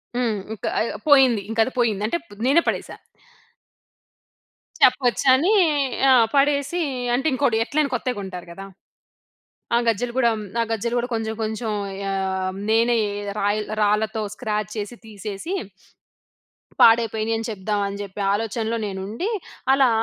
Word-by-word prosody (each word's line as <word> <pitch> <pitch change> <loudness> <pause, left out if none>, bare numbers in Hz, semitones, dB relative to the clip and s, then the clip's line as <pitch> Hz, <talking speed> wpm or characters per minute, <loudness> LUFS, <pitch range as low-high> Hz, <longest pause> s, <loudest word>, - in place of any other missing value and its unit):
హ్మ్. 235 -4 0 0.2
ఇంకా 220 - -4
ఆహ్, 230 - -1
పోయింది. 265 -7 +6
ఇంక 225 - -5
అది 260 - -5
పోయింది. 215 -4 +1
అంటే 285 - 0
ప్ - - -35 0.2
నేనే 285 +6 +5
పడేసా. - - -2 1.9
చెప్పొచ్చని 260 - +4 0.6
ఆ! - - +7 0.2
పడేసి 285 +4 +2 0.3
అంటే, 270 +5 +1
ఇంకోటి 260 -4 +1
ఎట్లైనా 290 +4 0
కొత్తయి 250 -1 -2
కొంటారు 185 -3 -7
కదా! 195 +3 -9 1.1
ఆ! - - +5
గజ్జలు 235 +2 0
కూడా 235 -2 +4
హ్మ్, 215 - -6 0.2
ఆ - - +3
గజ్జలు 235 +2 -1
కూడా 245 - -3
కొంచెం, 220 0 -2
కొంచెం 220 +1 -3 0.4
ఆహ్, 190 -1 -2 0.2
నేనే 230 +2 +3 0.4
రాయిల్ 205 +1 0
రాళ్ళతో 215 +1 +1
స్క్రాచ్ 215 -4 -3
చేసి, 210 +3 -4
తీసేసి 210 - -6 1.3
పాడైపోయినాయి 225 -1 +4
అని 225 - -4
చెప్దాం, 205 0 -2
అని 200 0 -6
జెప్పి, 200 0 -6
ఆలోచనలో 225 +2 -2
నేను 190 -1 -5
ఉండి, 235 - -3 0.4
అలా, 270 -2 +4
225 Hz, 135 wpm, -22 LUFS, 210-250 Hz, 1.9 s, ఆ